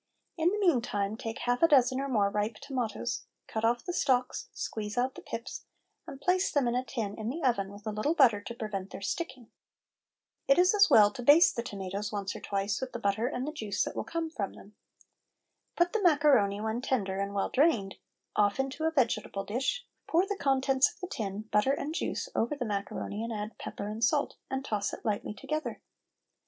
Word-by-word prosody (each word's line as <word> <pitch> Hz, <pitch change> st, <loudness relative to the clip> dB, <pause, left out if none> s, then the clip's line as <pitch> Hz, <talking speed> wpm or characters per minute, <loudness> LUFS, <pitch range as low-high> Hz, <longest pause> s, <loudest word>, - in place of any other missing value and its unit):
In 330 Hz, 0 st, +3 dB
the 415 Hz, -, -1 dB
meantime 230 Hz, -, +1 dB
take 225 Hz, 0 st, -5 dB
half 245 Hz, 0 st, +1 dB
a 330 Hz, -, +7 dB
dozen 260 Hz, -3 st, +4 dB
or 275 Hz, -, -2 dB
more 205 Hz, -5 st, +2 dB
ripe 210 Hz, +2 st, -1 dB
tomatoes; 250 Hz, -2 st, -3 dB, 0.2 s
cut 220 Hz, -, -4 dB
off 235 Hz, +1 st, +1 dB
the 355 Hz, -, -3 dB
stalks, 255 Hz, -6 st, +1 dB
squeeze 210 Hz, +1 st, -5 dB
out 255 Hz, +2 st, +1 dB
the -, -, -10 dB
pips, 230 Hz, +3 st, -6 dB, 0.4 s
and 275 Hz, -4 st, -8 dB
place 365 Hz, +4 st, +2 dB
them 280 Hz, -4 st, +2 dB
in 235 Hz, -, +1 dB
a 250 Hz, +1 st, 0 dB
tin 225 Hz, -5 st, -3 dB
in 220 Hz, +1 st, -2 dB
the 325 Hz, +7 st, -4 dB
oven 200 Hz, -7 st, +1 dB
with 205 Hz, +1 st, -12 dB
a 215 Hz, -, -1 dB
little 215 Hz, +10 st, 0 dB
butter 235 Hz, -9 st, +5 dB
to 235 Hz, +3 st, -7 dB
prevent 205 Hz, -5 st, -4 dB
their -, -, -8 dB
sticking. 255 Hz, -, -4 dB, 1.0 s
It 275 Hz, -, +5 dB
is 365 Hz, +2 st, +5 dB
as 410 Hz, -1 st, +6 dB
well 210 Hz, -1 st, +7 dB
to 260 Hz, -, -7 dB
baste 290 Hz, +7 st, +6 dB
the 235 Hz, -, -1 dB
tomatoes 200 Hz, -1 st, -4 dB
once 200 Hz, -2 st, -3 dB
or -, -, -6 dB
twice 200 Hz, +2 st, -2 dB
with 260 Hz, -1 st, -4 dB
the 240 Hz, -, -4 dB
butter 215 Hz, +2 st, +1 dB
and 255 Hz, 0 st, -3 dB
the -, -, -2 dB
juice 215 Hz, -9 st, -1 dB
that -, -, -5 dB
will -, -, -2 dB
come 330 Hz, -1 st, -3 dB
from 200 Hz, -, -3 dB
them. 205 Hz, -, -15 dB, 1.0 s
Put 350 Hz, 0 st, +2 dB
the 445 Hz, -, +1 dB
macaroni 285 Hz, -, +4 dB
when 220 Hz, +2 st, -2 dB
tender 200 Hz, -8 st, -1 dB
and 200 Hz, 0 st, -2 dB
well 195 Hz, -, 0 dB
drained 255 Hz, -10 st, +2 dB, 0.4 s
off 205 Hz, +2 st, +2 dB
into 270 Hz, +4 st, -1 dB
a -, -, +4 dB
vegetable 230 Hz, -8 st, 0 dB
dish, 270 Hz, -, -1 dB, 0.2 s
pour 345 Hz, +3 st, +3 dB
the 405 Hz, +1 st, -2 dB
contents 270 Hz, -3 st, +2 dB
of -, -, -22 dB
the 365 Hz, -, -6 dB
tin, 205 Hz, -4 st, -3 dB
butter 210 Hz, +6 st, +3 dB
and 290 Hz, +2 st, -3 dB
juice, 355 Hz, -, -2 dB
over 235 Hz, +6 st, 0 dB
the 260 Hz, -4 st, -3 dB
macaroni 205 Hz, 0 st, -3 dB
and 230 Hz, -, -4 dB
add 210 Hz, 0 st, -4 dB
pepper 200 Hz, -, -5 dB
and 215 Hz, +2 st, -4 dB
salt, 285 Hz, +5 st, +2 dB
and 265 Hz, 0 st, -3 dB
toss 205 Hz, -2 st, -1 dB
it -, -, -8 dB
lightly 210 Hz, -1 st, -2 dB
together. 305 Hz, +5 st, -4 dB
240 Hz, 210 wpm, -30 LUFS, 210-285 Hz, 1.0 s, a